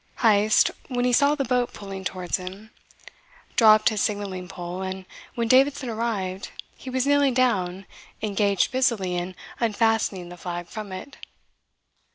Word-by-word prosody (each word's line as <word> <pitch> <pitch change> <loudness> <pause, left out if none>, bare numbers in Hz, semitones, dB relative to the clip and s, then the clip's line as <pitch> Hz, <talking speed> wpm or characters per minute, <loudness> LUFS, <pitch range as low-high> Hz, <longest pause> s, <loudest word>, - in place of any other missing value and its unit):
Heyst, 215 -2 +4 0.2
when 245 -1 -1
he 250 - +2
saw 285 +4 +4
the 275 -2 -1
boat 250 0 0
pulling 195 -1 -7
towards 185 -1 -2
him, 195 +4 -9 0.8
dropped 215 -3 +6
his 215 -3 -2
signalling 200 -4 -2
pole; 180 0 -6
and 190 0 -5 0.3
when 235 -1 0
Davidson 265 +1 +3
arrived, 205 -5 -3 0.3
he 260 - -9
was 255 0 0
kneeling 285 -2 +3
down 195 -7 +1 0.3
engaged 200 -1 +1
busily 235 -8 +1
in 175 +1 -3 0.2
unfastening 225 -5 +1
the 175 - -10
flag 175 0 -5
from 210 +3 -7
it. 185 +9 -8
210 Hz, 145 wpm, -25 LUFS, 185-245 Hz, 0.8 s, dropped